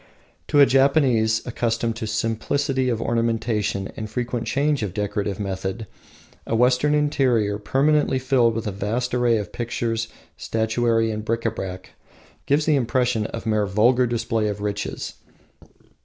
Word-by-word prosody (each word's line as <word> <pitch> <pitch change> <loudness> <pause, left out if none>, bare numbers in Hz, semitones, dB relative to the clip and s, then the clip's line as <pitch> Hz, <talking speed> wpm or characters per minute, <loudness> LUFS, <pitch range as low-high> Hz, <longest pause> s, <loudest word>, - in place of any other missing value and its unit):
To 145 - +3
a 140 - +9
Japanese, 135 -5 +3
accustomed 115 -1 -1
to 115 -2 -4
simplicity 130 +5 -1
of 115 -2 -1
ornamentation 115 -4 -1
and 110 -1 -6
frequent 120 0 -3
change 145 +1 +1
of 100 -4 -4
decorative 105 -1 -2
method, 95 +2 -4 0.6
a 115 - 0
Western 125 +5 +3
interior 125 -8 +1
permanently 140 +5 +2
filled 125 -3 +2
with 115 - -3
a 105 - -2
vast 110 +6 -2
array 120 -2 +3
of 105 -3 -5
pictures, 115 -1 -2 0.3
statuary, 115 0 0
and 105 0 -4
bric 115 +1 -2
a 115 - +2
brac 95 -1 -7 0.6
gives 145 +2 +2
the 155 - +3
impression 125 -3 0
of 115 - -7
mere 105 -2 +1
vulgar 120 +6 +3
display 115 -2 -1
of 105 -1 -3
riches. 105 -1 -4
115 Hz, 145 wpm, -23 LUFS, 105-125 Hz, 0.6 s, a